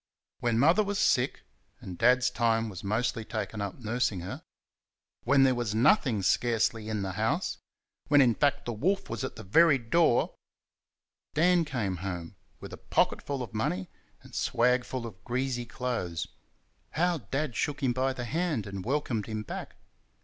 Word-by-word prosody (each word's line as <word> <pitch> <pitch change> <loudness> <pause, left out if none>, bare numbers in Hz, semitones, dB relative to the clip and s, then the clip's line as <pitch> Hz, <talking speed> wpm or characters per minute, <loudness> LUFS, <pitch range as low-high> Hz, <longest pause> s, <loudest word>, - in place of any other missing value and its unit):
When 120 -1 +1
Mother 165 - +5
was 205 0 -2
sick 130 -8 +2 0.4
and 90 - -8
Dad's 125 +4 +4
time 115 -1 +1
was 95 -3 -8
mostly 110 +3 -1
taken 110 -1 -4
up 100 -2 -4
nursing 110 -5 -1
her; 90 - -6 0.8
when 135 +2 +5
there 130 -1 +5
was 120 -4 -2
nothing, 120 - +3
scarcely, 115 +1 +1
in 105 -2 -2
the 95 - -3
house; - - -1 0.5
when, 145 0 +5
in 125 -4 +5
fact, 145 +4 +1
the 120 - -2
wolf 190 - -1
was 115 - -3
at - - -4
the 110 - -9
very 145 - +5
door; 125 +2 +2 1.0
Dan 175 +2 +4
came 110 -10 -2
home 90 -1 -5 0.2
with - - -9
a - - -7
pocket - - +1
full 140 -3 -3
of 115 - -9
money 95 -4 -2 0.3
and - - -16
swag 125 +1 +2
full 130 -2 -4
of 95 -5 -10
greasy 125 -1 -2
clothes. 115 -10 -3 0.7
How 175 0 +1
Dad 135 +3 -3
shook 145 +4 -2
him 125 -2 +2
by 130 +2 +1
the 125 -2 -5
hand 150 - -1
and 100 -2 -6
welcomed 125 -4 -1
him 110 -1 -4
back! - - -7
120 Hz, 170 wpm, -29 LUFS, 110-135 Hz, 1.0 s, Mother